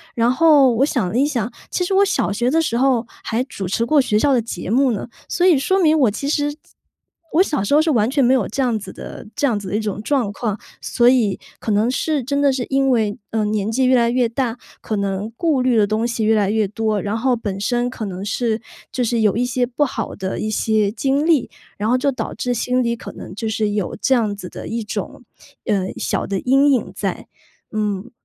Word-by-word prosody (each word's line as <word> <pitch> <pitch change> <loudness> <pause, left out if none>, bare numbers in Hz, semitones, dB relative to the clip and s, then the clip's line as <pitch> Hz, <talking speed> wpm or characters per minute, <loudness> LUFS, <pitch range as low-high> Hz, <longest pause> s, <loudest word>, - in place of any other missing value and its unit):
然 235 0 +2
后 285 -3 +5
我 260 +4 +3
想 245 -9 0
了 220 - -2
一 275 - +4
想， 240 -6 -2 0.2
其 360 - -1
实 385 - -2
我 395 - +6
小 375 - 0
学 240 +4 0
的 325 +4 +3
时 235 -7 -1
候， 255 -2 +2 0.2
还 230 +2 -1
主 200 -7 -6
持 230 +6 0
过 300 +4 +3
学 215 -5 +1
校 280 +6 +3
的 245 - +3
节 185 -6 -6
目 260 +4 +3
呢。 215 - -3 0.2
所 355 - +1
以 355 -5 +6
说 380 +8 +1
明 315 -2 +4
我 250 -7 +4
其 245 +7 -4
实 290 -1 0 0.8
我 330 - +5
小 295 - -1
时 205 - 0
候 300 - +6
是 320 - 0
完 225 -4 +2
全 280 -1 +2
没 250 +1 +4
有 255 -6 +2
这 270 - -2
样 245 -4 +1
子 195 -3 -8
的 - - -9
这 285 - +2
样 230 -5 +1
子 200 -2 -6
的 200 - -2
一 - - +1
种 210 -1 -3
状 250 -5 0
况。 215 0 -3 0.2
所 240 -1 +2
以， 235 -6 +2 0.2
可 220 - -3
能 210 +3 +2
是 290 +3 0
真 280 +3 -1
的 285 -1 +4
是 260 -2 -2
因 270 0 +2
为， 220 -5 +1
呃， 220 -1 0
年 210 0 -1
纪 260 +3 +1
越 255 0 +4
来 235 -1 +3
越 245 0 +2
大， 235 0 -2 0.2
可 215 - -3
能 200 +2 -2
顾 315 -6 +1
虑 250 -2 +2
的 210 -2 +4
东 215 +2 0
西 230 -2 -1
越 220 +1 +4
来 205 -2 +2
越 215 -1 +1
多。 215 0 -1
然 205 +3 -2
后 250 +2 +1
本 205 -4 -4
身 240 +4 0
可 230 -3 -6
能 190 -1 -5
是， 225 +1 -1 0.3
就 255 - -2
是 235 -1 0
有 210 -1 +2
一 245 - +1
些 250 0 0
不 255 +4 0
好 260 - -4
的 190 -1 -4
一 215 - -2
些 215 -1 +1
经 275 +6 0
历， 320 -6 +2 0.3
然 210 +2 -1
后 250 - +3
就 275 +2 +1
导 260 - -4
致 245 - -2
心 250 +2 0
里 235 0 0
可 - - -9
能 - - -9
就 225 +3 -4
是， 220 -1 0
有 205 -3 -2
这 265 - +3
样 220 -5 +1
子 185 -3 -8
的 - - -8
一 230 0 -3
种， 210 +4 -5 0.4
呃， 190 -2 0
小 - - -2
的 195 - -1
阴 275 +3 +4
影 255 - -1
在。 - - -3 0.4
嗯， 210 +1 -2
235 Hz, 265 characters per minute, -20 LUFS, 210-265 Hz, 0.8 s, 我